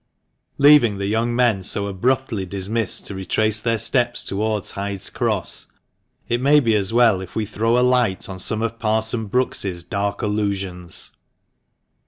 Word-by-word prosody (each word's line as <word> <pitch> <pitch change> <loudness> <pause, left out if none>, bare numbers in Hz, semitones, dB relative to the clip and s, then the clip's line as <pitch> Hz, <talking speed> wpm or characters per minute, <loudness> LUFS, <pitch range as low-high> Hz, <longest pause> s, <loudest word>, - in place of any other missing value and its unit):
Leaving 140 -8 +6
the 100 - -3
young 115 +3 0
men 120 -6 +2
so 100 +2 -3
abruptly 110 +2 -1
dimissed 100 +3 -3
to - - -6
retrace 105 +3 0
their 115 0 +1
steps 120 +1 0
towards 105 0 -2
Hyde's 100 -1 -4
Cross, - - -2 0.6
it 120 +1 0
may 145 +3 +5
be 115 -5 +2
as 100 -2 +2
well 115 -5 +4
if 95 - -10
we 110 - -1
throw 115 +3 0
a 125 - +4
light 120 -7 +1
on 95 -1 -7
some 110 +4 -1
of 115 0 -3
Parson 110 0 0
Brookes's 100 -6 -1
dark 100 +1 -3
allusions. 100 -4 -2
110 Hz, 155 wpm, -21 LUFS, 100-120 Hz, 0.6 s, Leaving